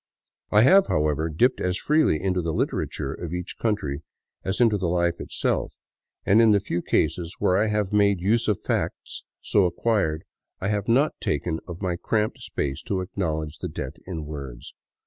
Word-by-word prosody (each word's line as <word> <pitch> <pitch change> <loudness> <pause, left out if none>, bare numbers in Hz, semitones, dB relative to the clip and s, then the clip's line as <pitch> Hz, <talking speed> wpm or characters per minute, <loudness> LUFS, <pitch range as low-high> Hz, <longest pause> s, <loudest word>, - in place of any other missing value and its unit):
I 105 +1 +5
have, 195 +8 +6
however, 75 +1 +1
dipped 120 +12 +2
as 90 0 0
freely 150 - +2
into 95 0 0
the 80 -1 -2
litera - - 0
ture 70 - -4
of 85 -1 -6
each 90 +1 -6
country 100 -11 -1 0.4
as 95 +1 -2
into 115 -3 +4
the 95 -3 -1
life 85 0 +1
itself, - - -2 0.5
and 105 +4 +5
in 110 -2 +6
the 100 - +4
few 85 -3 -3
cases 85 -1 0
where 90 - +2
I 105 +3 +3
have 105 -2 -1
made 100 -2 +4
use 110 +6 +1
of 105 -3 +1
facts - - -3 0.2
so 100 - +3
acquired, 90 -3 0 0.4
I 95 - -2
have 105 -1 -1
not 135 +6 +3
taken 80 +2 -1
of 85 +2 -7
my 90 -2 -1
cramped 105 +3 -1
space 70 +2 -3
to 95 -2 0
acknowledge 80 -5 -3
the - - -4
debt 65 +4 -6
in 80 -5 -5
words. 70 -5 -8
90 Hz, 185 wpm, -25 LUFS, 80-105 Hz, 0.5 s, have